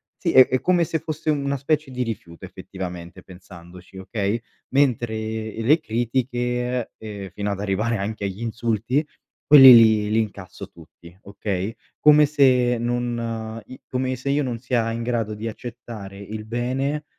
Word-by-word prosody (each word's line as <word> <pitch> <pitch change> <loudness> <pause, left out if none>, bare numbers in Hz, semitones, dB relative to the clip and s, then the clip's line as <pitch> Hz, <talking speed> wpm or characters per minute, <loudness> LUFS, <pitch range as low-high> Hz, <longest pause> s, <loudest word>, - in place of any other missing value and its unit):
sì, 170 - -2
è 130 -1 +7
è 130 - -1
come 180 -1 +2
se 160 0 -2
fosse 155 0 -3
u - - +1
una 140 0 -2
specie 150 +1 -1
di 125 -1 -3
rifiuto 95 -7 -7
effettivamente 90 -2 -8
pensandoci, 90 0 -14
okay. 100 +3 -2 0.4
Mentre 120 -5 +2
e 110 0 -4
le 150 +8 +4
critiche, 125 -1 -2
ehm, 100 -3 -7
fino 100 +2 -4
ad 100 - -3
arrivare 105 +3 -1
anche 100 +1 -4
agli 100 +3 -5
insulti, 115 +4 -1 0.5
quelli 135 -3 +11
li 110 -2 +5
li 110 - +2
incasso 100 -4 -7
tutti, 85 +1 -17
okay. 100 +1 -4 0.2
Come 150 0 +6
se 125 -4 +3
non 115 -2 -3
i 130 - -12
come 130 0 -1
se 130 +3 -5
io 145 +1 +1
non 120 -3 -4
sia 120 -2 -1
in 115 - -4
grado 115 -3 -2
di 110 +2 -6
accettare 115 -4 -8
il 105 +2 -7
bene, 130 +6 -2
115 Hz, 160 wpm, -23 LUFS, 105-130 Hz, 0.5 s, quelli